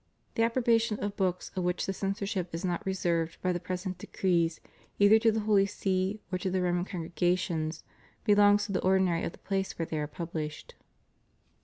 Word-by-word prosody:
The - - 0
approbation 230 -2 +2
of 205 0 -3
books 185 -3 -1
of 185 - -1
which 180 0 0
the 195 - -2
censorship 195 -2 -2
is 165 - -3
not 175 -2 -1
reserved 170 -3 0
by 185 -1 +2
the 175 - -2
present 185 +1 -4
decrees 170 -3 0 0.4
either 205 +2 +6
to 225 0 +4
the 220 0 -1
Holy 205 -2 +3
See 190 0 -1
or 185 - -1
to 190 - -1
the 185 0 0
Roman 175 0 +1
congregations 170 -2 -1 0.4
belongs 205 -1 +5
to 205 - -5
the 185 - 0
or 190 +1 +4
dinary 180 -3 +1
of - - -6
the - - -14
place 195 -1 -2
where 165 - -1
they 160 -1 -3
are 150 - -2
pubUshed. 155 -1 -5
185 Hz, 190 wpm, -30 LUFS, 175-205 Hz, 0.4 s, either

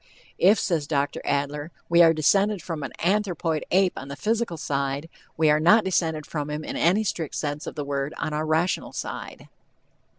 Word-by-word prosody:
"If," 200 +5 +6
says 165 -8 -1
Dr. 140 -1 -1
Adler, 145 +2 -1 0.2
"we 170 0 +5
are 165 -1 +7
descended 195 +6 +2
from 165 -4 -5
an 140 - -5
anthropoid 175 -4 0
ape 190 0 +3
on 135 - -7
the 140 - -6
physical 220 -2 -1
side, 140 +1 -2 0.3
we 160 0 +3
are 150 - +3
not 210 +8 +5
descended 160 -5 0
from 150 -2 -4
him 150 +1 -4
in - - -5
any 185 +6 +3
strict 165 -7 -3
sense 145 0 -3
of - - -6
the 145 -2 -4
word 140 +1 -3
on 155 - -3
our 155 +1 -2
rational 160 +3 0
side." - - -6
160 Hz, 190 wpm, -25 LUFS, 145-180 Hz, 0.3 s, are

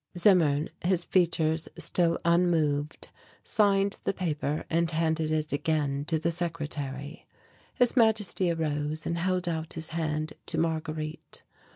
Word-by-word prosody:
Zimmern, 165 -6 +4
his 175 -1 +1
features 165 -3 +1
still 170 -2 +1
unmoved, 165 -4 +1 0.3
signed 200 -2 +2
the - - -1
paper 150 -4 -2
and 165 0 +1
handed 160 -1 0
it 155 -1 -1
again 145 -2 0
to 160 0 +1
the 165 +2 0
secretary. 150 -3 -4 0.5
His 245 -2 +3
Majesty 215 -6 +3
arose 155 -2 -1
and 170 0 -1
held 185 0 0
out 160 -1 -2
his 160 -1 -4
hand 155 -1 -2
to 165 - -2
Marguerite. 155 -1 -3
160 Hz, 130 wpm, -28 LUFS, 155-175 Hz, 0.5 s, Zimmern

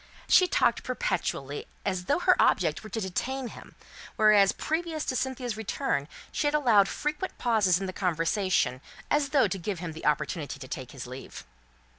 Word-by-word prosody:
She 365 - +6
talked 235 -8 +2
perpetually, 175 - -2 0.2
as 185 -2 -1
though 285 - +2
her 365 +1 +4
object - - +2
were 215 - -9
to 225 - -3
detain 245 +6 -3
him; - - -13 0.4
whereas, 210 -2 +5
previous 320 -1 -2
to 255 - -2
Cynthia's 255 -3 -2
return, 215 - -2 0.2
she 295 - 0
had 295 - +1
allowed 230 -9 +5
frequent 300 +5 -3
pauses 210 -7 +3
in 195 - -3
the 185 - -4
conversation, 175 - 0 0.3
as 295 -1 +2
though 275 -2 +4
to 195 - -4
give 190 +2 -3
him 165 -1 -5
the 160 - -4
opportunity 150 -1 -1
to 135 -2 -9
take 130 -1 -6
his 130 -2 -8
leave. 130 +2 -9
205 Hz, 175 wpm, -28 LUFS, 170-265 Hz, 0.4 s, She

